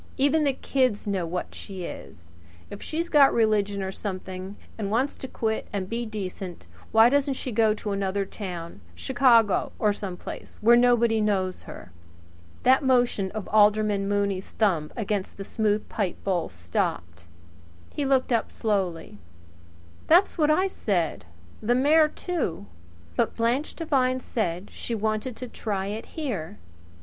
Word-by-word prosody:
Even 290 +3 +3
the 280 - +2
kids 255 -5 0
know 195 -4 -1
what 180 +2 -4
she 190 -2 -8
is. 85 - -9 0.4
If 205 - -8
she's 330 +2 -3
got 290 -5 +6
religion 205 -3 +1
or 190 - -3
something, 190 -1 -6 0.2
and 205 -3 -3
wants 250 +7 0
to 265 - -7
quit 220 -3 -2
and 195 -2 -3
be 230 +3 -3
decent, 190 -4 -6 0.3
why 225 +1 +7
doesn't 275 +1 +2
she 255 - -4
go 220 -1 +3
to 210 -1 -5
another 195 0 -1
town 175 - -7
Chicago 240 - +3
or 210 -1 +2
some 190 -3 -6
place - - -9
where 235 +2 +6
nobody 235 -2 +4
knows 190 -3 0
her?" 90 - -10 0.7
That 260 +2 +5
motion 245 -7 +2
of 215 -3 -5
Alderman 210 -1 +3
Mooney's 200 -2 -1
thumb 170 -9 0
against 205 -3 -2
the 200 - -5
smooth 215 0 0
pipebowl 190 -3 -2
stopped. 85 0 -3 0.6
He 290 - -3
looked 265 -2 +2
up 230 - 0
slowly. 185 - -2 0.9
"That's 355 +5 +5
what 305 -3 +2
I 365 +5 +4
said 185 - -1 0.4
the 240 +3 +2
mayor 305 +4 +5
too. 305 - -3 0.5
But - - 0
Blanche 240 +6 0
Devine 260 -6 +1
said 190 -6 -3
she 235 - -4
wanted 220 +3 -2
to 250 - -7
try 200 -5 -3
it 210 +3 -5
here. 200 - -4
215 Hz, 150 wpm, -26 LUFS, 190-250 Hz, 0.9 s, why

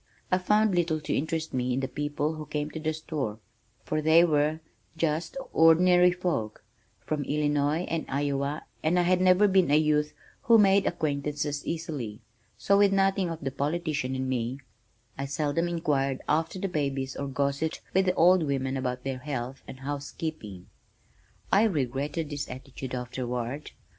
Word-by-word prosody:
I 185 - +3
found 210 +2 +3
little 170 -3 +1
to 150 - -2
interest 160 +2 -2
me 125 0 0
in - - 0
the 135 - -2
people 145 +2 -2
who 155 -1 -7
came 150 0 -3
to 160 - -6
the 155 0 -1
store 155 -8 -4 0.5
for 155 - -1
they 160 +2 +6
were 155 -1 +2 0.4
"just 165 - -1 0.2
ordinary 180 +2 +6
folk" 175 -15 -3 0.4
from 150 -2 -1
Illinois, 145 +2 +1
and 165 -3 -3
Iowa, 140 +1 -1 0.2
and 165 +3 +2
I 175 - +4
had 180 +1 +2
never 185 +3 +5
been 190 -4 +3
a 145 - +4
youth 150 -1 +2 0.3
who 230 -1 +6
made 200 -1 +4
acquaintances 145 -2 -2
easily, 150 -11 -4 0.4
so 200 0 +3
with 200 -1 +5
nothing 195 -1 +2
of 165 -1 -6
the 135 - -2
politician 145 -2 -2
in 130 0 -2
me, 125 0 -2 0.6
I 135 - -1
seldom 150 +4 0
inquired 145 -6 -1
after 160 +4 0
the 195 - -2
babies 140 -5 -2
or 140 - -4
gossiped 140 +3 -1
with 190 +1 +3
the 185 - +2
old 180 +2 +5
women 135 -3 -1
about 125 -1 -3
their 135 -1 -3
health 130 -2 -5
and 130 - -10
housekeeping. 140 - -5 0.9
I 200 - +5
regretted 145 - -1
this 145 -1 -4
attitude 130 0 -7
afterward. 125 +2 -4
150 Hz, 165 wpm, -28 LUFS, 135-170 Hz, 0.9 s, they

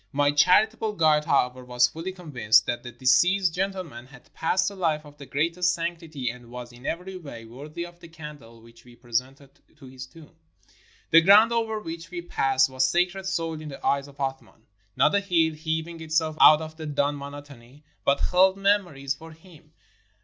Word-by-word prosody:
My 145 0 +2
charitable 215 +8 +3
guide, 155 -5 +3
however, 125 -2 +1
was 125 0 +2
fully 165 +7 -6
convinced 125 - +2
that 120 0 -3
the 120 - -9
deceased 165 - +3
gentleman 180 -10 -4
had 130 -2 -18
passed 185 +4 0
a - - -10
life 160 -5 -1
of 145 0 -15
the 140 - -10
greatest 170 +5 0
sanctity, 165 -5 -5
and 120 -1 -14
was 120 0 -9
in 125 +3 -11
every 185 +2 -4
way 140 -9 -10
worthy 145 +9 -8
of 175 0 -14
the 170 - -13
candle 150 -8 -12
which 115 0 -18
we 120 -1 -17
presented 130 +3 -4 0.3
to 145 - -15
his 130 0 -10
tomb. 160 +1 -17 0.8
The 165 - +8
ground 205 +6 +6
over 225 -2 -1
which 165 -4 -8
we 175 -1 -6
passed 135 -6 +2
was 130 0 -1
sacred 180 +7 0
soil 165 -4 -3
in 155 - -8
the 135 - -10
eyes 140 0 +1
of 140 0 -16
Athman. 135 -4 -6 0.3
Not - - +3
a 200 - +4
hill, 170 -5 +1
heaving 160 +1 -4
itself 160 0 -1
out 155 +1 +8
of 155 0 -10
the 160 -1 -7
dun 145 0 0
monotony, 140 -1 -11 0.2
but 140 - +2
held 190 +1 +3
memories 185 -9 0
for 160 +3 -13
him. 160 -2 -19
155 Hz, 185 wpm, -25 LUFS, 130-175 Hz, 0.8 s, The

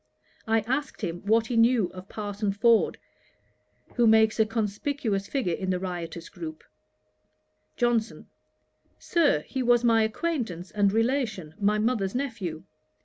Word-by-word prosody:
I 225 0 +3
asked 265 +6 -3
him 170 +1 -3
what 225 +1 +4
he 240 - -3
knew 230 -4 +3
of 185 +1 -10
Parson 205 -1 -3
Ford, 230 +2 +3 1.0
who 240 -1 +4
makes 220 0 +4
a 220 - +4
conspicuous 220 -1 -2
figure 250 -12 -1
in 190 +2 -3
the 185 - +1
riotous 175 -2 -5
group. 315 -1 -8 1.1
JOHNSON. 240 -2 0 0.7
'Sir, 315 - +2
he 260 - -4
was 240 -1 +3
my 230 -2 +4
acquaintance 220 - -2
and 205 -1 +2
relation, 225 - -1
my 210 +1 +2
mother's 215 -3 0
nephew. 215 - -4
220 Hz, 135 wpm, -27 LUFS, 195-240 Hz, 1.1 s, what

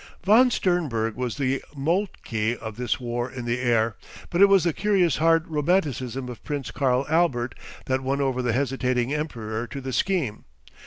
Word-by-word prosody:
Von 225 +7 +6
Sternberg 150 - 0
was 125 -1 -3
the 135 -1 0
Moltke 135 - -1
of 110 -2 -7
this 120 0 -1
War 120 0 -3
in 125 -2 -7
the 120 +1 -1
Air, 115 -3 +1 0.3
but 175 - +1
it 200 - +9
was 195 -2 +5
the 170 -2 +1
curious 190 -6 +2
hard 165 0 +3
romanticism 145 -6 0
of 125 -3 -9
Prince 140 -5 -4
Karl 130 0 +1
Albert 150 -7 +1 0.3
that 130 0 0
won 135 +1 -1
over 130 -2 0
the 125 -2 0
hesitating 125 0 0
Emperor 120 -7 -3
to 140 - -6
the 130 -1 -5
scheme. 160 - -1
130 Hz, 170 wpm, -25 LUFS, 120-165 Hz, 0.3 s, it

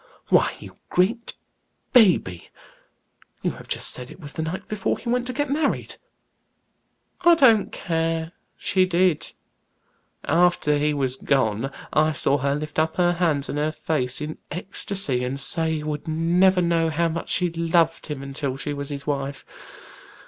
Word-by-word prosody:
"Why, - - +3
you - - -12
great 230 +6 0 0.6
baby! 180 - +4 0.9
You - - +1
have - - -12
just - - +2
said 125 0 -4
it - - -13
was 145 -4 -7
the - - -4
night 160 +4 -4
before 215 -2 -1
he - - -11
went 245 +1 0
to - - -1
get 290 +2 -1
married!" 285 +1 -1 1.2
"I 345 -1 +6
don't 235 -9 +4
care, 165 -1 -2 0.3
she 185 -1 +2
did. 180 -3 +1 0.9
After 170 -2 +2
he 150 +1 +1
was 135 -3 -1
gone, 130 -3 0 0.2
I 155 +1 +3
saw 140 -1 +1
her 140 +1 0
lift 150 +1 -4
up 160 0 0
her 175 -1 +3
hands 160 -5 +1
and 145 - -3
her 155 +1 0
face 140 -5 -2
in 155 +1 -5
ecstacy, 180 -7 -2
and 130 +2 -3
say 160 +2 +2
he 150 - -4
would 150 +1 -4
never 175 +4 +3
know 165 -1 +2
how 165 +2 +1
much 165 0 -4
she 180 -1 +2
loved 165 0 +1
him 145 -3 -5
until 135 -1 -4
she 145 +1 -4
was 140 0 -5
his 140 -1 -6
wife. 140 -1 -3
160 Hz, 165 wpm, -23 LUFS, 145-180 Hz, 1.2 s, I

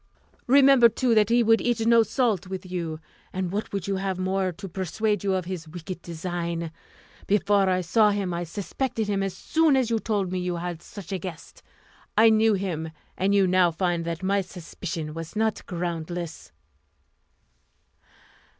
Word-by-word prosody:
Remember, 270 -2 +7
too, 235 +2 +1
that 215 -1 +4
he 240 +1 +4
would 225 0 +4
eat 235 -2 0
no 230 0 +6
salt 220 -4 0
with 190 0 -6
you; 170 -4 -4 0.3
and 185 -1 -3
what 210 +2 -3
would 200 -2 -3
you 195 -1 0
have 190 -1 -2
more 185 0 0
to 195 +3 -9
persuade 200 +3 -1
you 195 -1 +1
of 185 -2 -2
his 175 -3 -5
wicked 175 +2 -7
design? 170 -1 -4 0.6
Before 200 -1 +3
I 185 0 +2
saw 210 +5 +4
him, 200 -3 -1
I 170 +1 -2
suspected 220 - -3
him 200 -1 0
as 195 -1 -3
soon 320 -3 +2
as 250 -3 +1
you 225 - +2
told 205 -5 -1
me 185 - -1
you 180 -1 -2
had 175 -1 -4
such 200 -1 -10
a 190 - -2
guest. 170 -2 -9 0.6
I 225 +1 +7
knew 220 0 +4
him, 170 -5 -3 0.3
and 195 +2 +1
you 195 -1 +5
now 185 -1 +4
find 170 0 -1
that 170 +2 -4
my 200 +1 +2
suspicion 170 -3 -6
was 165 +3 -7
not 220 0 0
groundless." 170 -1 -4
190 Hz, 175 wpm, -25 LUFS, 175-215 Hz, 0.6 s, Remember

